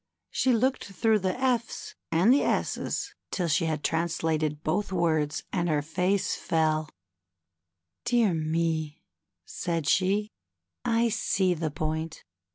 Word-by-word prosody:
She 260 - +2
looked 255 +3 +1
through 215 +2 +2
the 185 +4 -1
F's 245 -3 -1 0.2
and 180 +9 +5
S's 280 - 0 0.2
till 180 -3 -1
she 160 +1 +2
had 155 -2 -2
translated 160 -2 0
both 195 +6 0
words, 160 -4 +1
and 175 0 0
her 150 -2 +1
face 180 +5 0
fell. 155 -1 0 1.2
^^Dear 235 -6 +3
me," 160 0 -1 0.4
said 165 -3 -2
she, 200 +3 +2 0.5
I 235 -1 +2
see 190 -4 +1
the 160 -2 -2
point. 160 +2 -3
170 Hz, 120 wpm, -28 LUFS, 155-210 Hz, 1.2 s, and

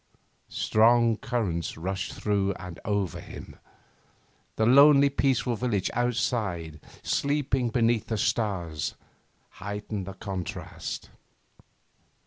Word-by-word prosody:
Strong 115 0 +3
currents 95 -13 -2
rushed 95 +4 -3
through 100 -2 0
and 90 -3 -9
over 100 -4 -1
him. - - -10 1.0
The 110 - +2
lonely, 140 +3 +7
peaceful 130 -3 +1
village 110 -5 -1
outside, 110 -9 -1 0.2
sleeping 140 -3 0
beneath 115 -1 +1
the 110 - -1
stars, 90 -9 -1 0.5
heightened 105 0 -5
the 95 - -5
contrast. 95 -3 -6
110 Hz, 95 wpm, -27 LUFS, 95-120 Hz, 1.0 s, lonely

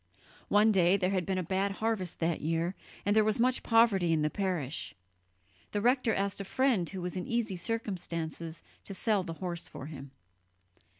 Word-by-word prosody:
One 210 +2 +5
day 185 -1 +4
there 185 -1 0
had 185 -3 0
been 190 -1 0
a 185 - 0
bad 195 +3 0
harvest 210 -4 -2
that 165 0 0
year, 165 +3 0 0.3
and 205 +1 +2
there 215 - +6
was 215 +1 +1
much 255 +2 +2
poverty 225 -7 +4
in 155 -1 +2
the 150 - +1
parish 175 -8 -2 0.8
the 205 - +1
rector 245 +1 +3
asked 200 0 -1
a - - -3
friend 225 -4 +1
who 190 -3 -6
was 180 +1 -3
in 180 - -4
easy 235 -5 0
circumstances 170 -6 -4 0.2
to 195 - -6
sell 210 0 +1
the 170 -3 -5
horse 170 0 -4
for - - -8
him. 140 -2 -8
190 Hz, 185 wpm, -31 LUFS, 170-215 Hz, 0.8 s, there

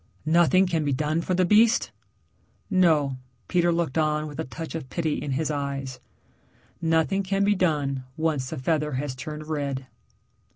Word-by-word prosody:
"Nothing 175 +4 +4
can 165 -4 0
be 145 -1 0
done 155 +4 0
for 180 +2 -1
the 185 0 +3
beast?" 220 +5 +4 0.8
"No." 155 -8 +3 0.3
Peter 175 -1 +2
looked 165 -4 0
on 155 0 +1
with 145 -2 -8
a - - 0
touch 160 +6 -7
of 160 -5 -6
pity 160 -3 -1
in 145 -2 -3
his 155 +3 -1
eyes, 140 -2 -4 0.8
"Nothing 165 +4 +2
can 195 +1 0
be 205 +1 +4
done 145 -8 0
once 155 -5 0
the - - -5
feather 150 +2 0
has 130 +1 -2
turned 150 +4 -7
red." 140 -4 -3
155 Hz, 165 wpm, -25 LUFS, 140-170 Hz, 0.8 s, Nothing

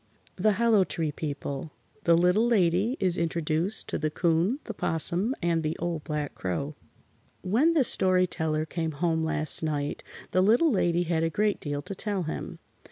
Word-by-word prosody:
THE 210 +3 +2
HOLLOW 225 -2 +4
TREE 160 -4 -2
PEOPLE 145 0 -5 0.4
THE 170 -1 +5
LITTLE 180 +7 +3
LADY 200 +2 +2
IS 180 -3 0
INTRODUCED 165 +4 -1
TO - - -3
THE 155 - 0
'COON, 170 - +1
THE - - -6
'POSSUM 175 - 0
AND 170 -1 +1
THE 155 0 -2
OLD 170 -2 -3
BLACK 150 -2 -3
CROW 140 - -3 0.7
When 240 - +3
the 310 -5 +4
Story 185 -5 +2
Teller 155 -3 -1
came 160 0 -3
home 160 +2 0
last 155 -1 0
night 150 -2 -2 0.3
the 185 - +3
Little 235 - +4
Lady 175 -5 +2
had 165 -1 0
a 165 - +1
great 205 +5 0
deal 145 -1 -4
to 195 - -5
tell 200 -1 -1
him. 155 - -5
170 Hz, 170 wpm, -27 LUFS, 155-195 Hz, 0.7 s, THE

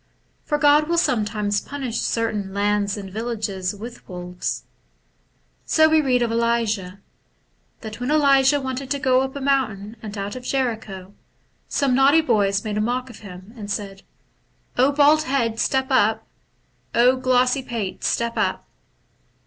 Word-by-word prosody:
For 295 - 0
God 295 0 +4
wiU 340 +2 -1
sometimes 210 -8 0
punish 265 -5 -4
certain 210 -4 -2
lands 205 0 0
and 195 -2 -8
villages 210 -4 -3
with 230 +4 -10
wolves. 180 0 -5 1.0
So 315 0 +4
we 315 0 +4
read 250 -4 +2
of 235 - -1
Elisha, 230 -5 0 0.4
— - - -43
that 215 -1 -8
when 245 +2 -3
Elisha 280 -2 +4
wanted 260 0 -5
to 285 - 0
go 260 -2 +3
up 265 +1 -4
a - - -4
mountain 240 -7 -1 0.2
out 200 +2 -4
of 255 - -6
Jericho, 220 -8 -3 0.5
some 275 -3 +1
naughty 275 +5 +5
boys 205 -7 +1
made 210 -1 -2
a - - +1
mock 250 +3 -2
of 225 - -13
him 190 +1 -12
and 210 -3 -8
said, 200 -2 -5 0.4
* - - -42
bald 285 +4 +4
head, 240 -6 -1
step 265 0 0
up! 220 -3 +2 0.7
glossy 255 +2 +3
pate, 230 -7 -5
step 235 0 0
up - - -1
235 Hz, 150 wpm, -22 LUFS, 205-265 Hz, 1.0 s, naughty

